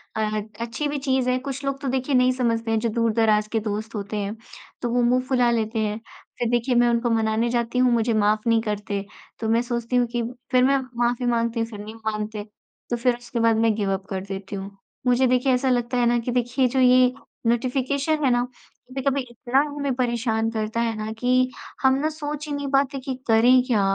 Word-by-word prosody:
अ, 215 -1 -1 0.2
अच्छी 235 +6 -2
भी 290 - -2
चीज़ 260 -2 +1
है। 250 - +2
कुछ 275 +1 -6
लोग 275 0 -2
तो 275 - -3
देखिए 260 +1 0
नहीं 250 0 +4
समझते 230 -3 0
हैं 220 - +2
जो 230 0 0
दूर-दराज 220 -1 +2
के 225 - +1
दोस्त 215 +1 -4
होते 205 +1 -4
हैं, 205 +2 -3 0.5
तो 240 - -1
वो 245 +1 +2
मुँह 250 +1 +3
फुला 250 -2 +3
लेते 225 -1 -1
हैं। 215 0 -1 0.4
फिर 240 -1 0
देखिए, 240 +1 +1
मैं 240 0 +4
उनको 235 0 +1
मनाने 225 +1 +1
जाती 235 0 -1
हूँ, 250 -1 +4
मुझे 230 0 +1
माफ 215 0 +2
नहीं 230 -1 +4
करते। 210 -2 -3 0.3
तो 220 -1 -2
मैं 230 +1 +3
सोचती 240 0 -3
हूँ 245 -1 +3
कि 240 - +1 0.3
फिर 255 0 +4
मैं 275 +1 +4 0.3
माफी 245 +1 0
माँगती 235 -1 0
हूँ. 225 - 0
फिर 210 -3 -9
नहीं 215 +2 -8
मानते, 215 -1 -4 0.5
तो 240 - 0
फिर 240 +1 +2
उसके 240 0 -5
बाद 230 0 +4
मैं 225 -1 +3
गिव 200 -2 -1
अप 190 0 -4
कर 190 -1 -3
देती 195 0 -6
हूँ। 195 0 -7 0.3
मुझे 250 +1 +4
देखिए 255 +1 +2
ऐसा 255 +1 +1
लगता 245 0 0
है 245 - +3
ना 240 0 +3
कि 240 +1 -3
देखिए 250 +2 +1
जो 260 +2 -1
ये 255 0 +5 0.3
नोटिफिकेशन 270 +5 0
है 260 - +4
ना, 245 0 +2 0.5
कभी-कभी 270 +1 -1
इतना 245 +3 0
हमें 285 -2 -2
परेशान 230 -3 0
करता 220 +1 -2
है 230 -1 0
ना 215 0 -4
कि 255 +1 +2 0.3
हम 265 0 +5
ना 310 +2 0
सोच 300 -1 -5
ही 295 - -3
नहीं 285 0 -3
पाते 275 0 +2
कि 260 0 -4
करें 240 +3 +6
क्या, 225 -6 +2
240 Hz, 220 wpm, -24 LUFS, 220-255 Hz, 0.5 s, करें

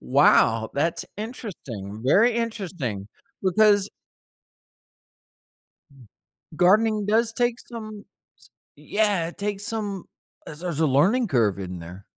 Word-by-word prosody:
Wow, 110 0 +3
that's 165 +4 -1
interesting, 140 - -7
very 220 - +4
interesting, 180 - -3 0.3
because 205 +1 +3 2.7
Gardening 210 +4 +3
does 225 +2 +2
take 240 +1 0
some 215 -3 -9 0.3
s - - -18 0.3
Yeah, 205 -5 0
it 170 - -10
takes 205 0 -3
some 205 -4 -3 0.4
as 150 - -9
there's 170 -3 -4
a 160 - +3
learning 190 - +3
curve 115 - +1
in 90 -2 -6
there. 90 +4 -10
195 Hz, 110 wpm, -24 LUFS, 135-220 Hz, 2.7 s, very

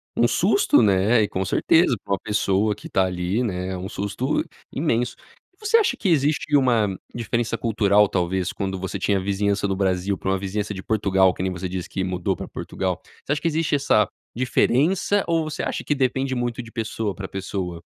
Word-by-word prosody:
um 120 - +4
susto, 195 - +3
né, 105 +3 +4
e, - - 0
com 95 - -2
certeza, 145 - +3
pra 100 - -2
uma 95 - 0
pessoa 105 0 +1
que - - -10
tá 95 - +2
ali, 90 +5 -1
né, 90 -4 -2
é 95 - -3
um 95 +2 -6
susto 105 +9 -1 0.3
imenso. 125 -5 0 0.4
E - - -38
você 435 +2 +3
acha 380 -12 +2
que 190 - 0
existe 150 -1 +2
uma 120 -6 +3 0.3
diferença 120 0 -1
cultural, 105 -2 +3
talvez, 90 -1 -1
quando 95 -1 -3
você 95 +1 -4
tinha 100 0 +1
a - - -1
vizinhança 100 +1 0
do 95 - -1
Brasil 95 0 0
pra 95 - -4
uma 95 - +2
vizinhança 100 +2 -3
de 95 -2 -6
Portugal, 95 -4 +3
que - - -6
nem 95 0 0
você 90 0 -4
diz 90 0 -4
que 95 - -3
mudou 90 0 -1
pra - - -7
Portugal? 95 -1 -3 0.2
Você - - -3
acha 150 - -3
que 170 - 0
existe 160 -1 0
essa 110 -6 +3 0.3
diferença 155 +10 +2
ou 165 -1 +2
você 155 -1 -4
acha - - -3
que 145 - 0
depende 130 0 0
muito 120 0 -2
de 115 -1 -12
pessoa 110 -4 -3
pra 95 -1 -6
pessoa? 95 -3 -4
105 Hz, 210 wpm, -23 LUFS, 95-125 Hz, 0.4 s, um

